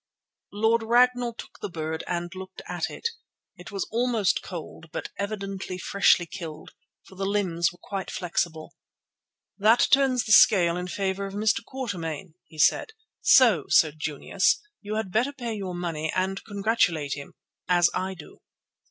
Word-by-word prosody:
Lord 225 Hz, +3 st, +2 dB
Ragnall 240 Hz, +1 st, +3 dB
took -, -, -11 dB
the -, -, -4 dB
bird 160 Hz, -1 st, -4 dB
and 175 Hz, 0 st, -3 dB
looked 190 Hz, 0 st, -9 dB
at -, -, -2 dB
it. -, -, -3 dB, 0.5 s
It 180 Hz, 0 st, -11 dB
was 195 Hz, -2 st, -3 dB
almost 230 Hz, -4 st, +1 dB
cold, 165 Hz, -2 st, -8 dB
but -, -, -5 dB
evidently 195 Hz, -2 st, -4 dB
freshly 185 Hz, -1 st, +3 dB
killed, 165 Hz, -3 st, -8 dB, 0.3 s
for -, -, -17 dB
the 195 Hz, +1 st, -3 dB
limbs 180 Hz, -5 st, +1 dB
were 175 Hz, -, -18 dB
quite 195 Hz, +1 st, -5 dB
flexible. 170 Hz, -3 st, -3 dB, 0.9 s
"That 220 Hz, +4 st, +5 dB
turns 265 Hz, -3 st, +4 dB
the 220 Hz, -, -4 dB
scale 175 Hz, -3 st, +6 dB
in 180 Hz, 0 st, -4 dB
favour 195 Hz, +1 st, -2 dB
of 195 Hz, -, -8 dB
Mr. 215 Hz, +2 st, +1 dB
Quatermain," 185 Hz, -, -5 dB
he 160 Hz, -, -16 dB
said, 445 Hz, -, +3 dB, 0.3 s
"so, 220 Hz, -, +6 dB
Sir 155 Hz, -, +5 dB
Junius, 155 Hz, +4 st, 0 dB, 0.2 s
you 210 Hz, +1 st, -4 dB
had 215 Hz, -4 st, -3 dB
better 240 Hz, +7 st, +1 dB
pay 240 Hz, -4 st, -4 dB
your 190 Hz, -4 st, -5 dB
money 165 Hz, -3 st, -3 dB
and 190 Hz, +1 st, -1 dB
congratulate 200 Hz, -9 st, 0 dB
him, 140 Hz, -1 st, -8 dB, 0.3 s
as 175 Hz, -1 st, +5 dB
I 190 Hz, +1 st, -2 dB
do." 160 Hz, -, -13 dB
190 Hz, 155 wpm, -26 LUFS, 175-220 Hz, 0.9 s, scale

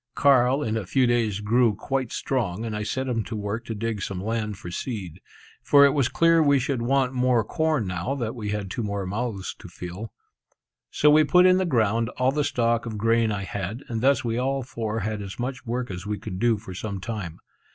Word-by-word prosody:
Carl 135 Hz, 0 st, +4 dB
in 110 Hz, -3 st, -1 dB
a 100 Hz, -5 st, -4 dB
few 130 Hz, +4 st, +3 dB
days 115 Hz, -4 st, +1 dB
grew 115 Hz, +1 st, +3 dB
quite 130 Hz, +3 st, -2 dB
strong, 115 Hz, -5 st, -2 dB
and 110 Hz, -2 st, -3 dB
I 105 Hz, -, -3 dB
set 130 Hz, +5 st, -2 dB
him 115 Hz, -3 st, -1 dB
to 115 Hz, -, -5 dB
work 105 Hz, +2 st, -4 dB
to 115 Hz, -, -4 dB
dig 110 Hz, -1 st, -3 dB
some 95 Hz, -1 st, -4 dB
land 105 Hz, 0 st, -2 dB
for 85 Hz, -, -8 dB
seed; 95 Hz, -, -5 dB, 0.4 s
for 140 Hz, -1 st, +6 dB
it 140 Hz, -, +5 dB
was 135 Hz, -4 st, +2 dB
clear 165 Hz, +4 st, +4 dB
we 145 Hz, -2 st, +4 dB
should 130 Hz, -1 st, -1 dB
want 130 Hz, +1 st, +1 dB
more 125 Hz, -2 st, +2 dB
corn 155 Hz, 0 st, 0 dB
now 90 Hz, +9 st, -2 dB
that 115 Hz, -5 st, -3 dB
we 110 Hz, -5 st, -5 dB
had 100 Hz, -2 st, -3 dB
two 120 Hz, -, -3 dB
more 100 Hz, -2 st, -3 dB
mouths 105 Hz, 0 st, -3 dB
to -, -, -10 dB
fill. 90 Hz, +5 st, -8 dB, 0.8 s
So 150 Hz, -, +4 dB
we 155 Hz, +1 st, +6 dB
put 180 Hz, +5 st, +5 dB
in 185 Hz, 0 st, +6 dB
the 190 Hz, -, +1 dB
ground 115 Hz, -, +1 dB
all 130 Hz, +1 st, +3 dB
the 150 Hz, +1 st, 0 dB
stock 115 Hz, -3 st, 0 dB
of 110 Hz, -2 st, -5 dB
grain 115 Hz, +1 st, +2 dB
I 100 Hz, -1 st, -2 dB
had, 100 Hz, +5 st, -5 dB
and 115 Hz, -2 st, -2 dB
thus 135 Hz, 0 st, +3 dB
we 115 Hz, +1 st, -1 dB
all 135 Hz, +1 st, 0 dB
four 115 Hz, -2 st, -3 dB
had 105 Hz, +1 st, -3 dB
as 95 Hz, -1 st, -7 dB
much 125 Hz, +1 st, -4 dB
work 120 Hz, -1 st, -2 dB
as 90 Hz, +2 st, -6 dB
we 105 Hz, 0 st, -2 dB
could 95 Hz, -4 st, -6 dB
do 120 Hz, -1 st, +3 dB
for 100 Hz, -3 st, -9 dB
some 100 Hz, +1 st, -5 dB
time. 95 Hz, -4 st, -5 dB
115 Hz, 225 wpm, -25 LUFS, 105-130 Hz, 0.8 s, for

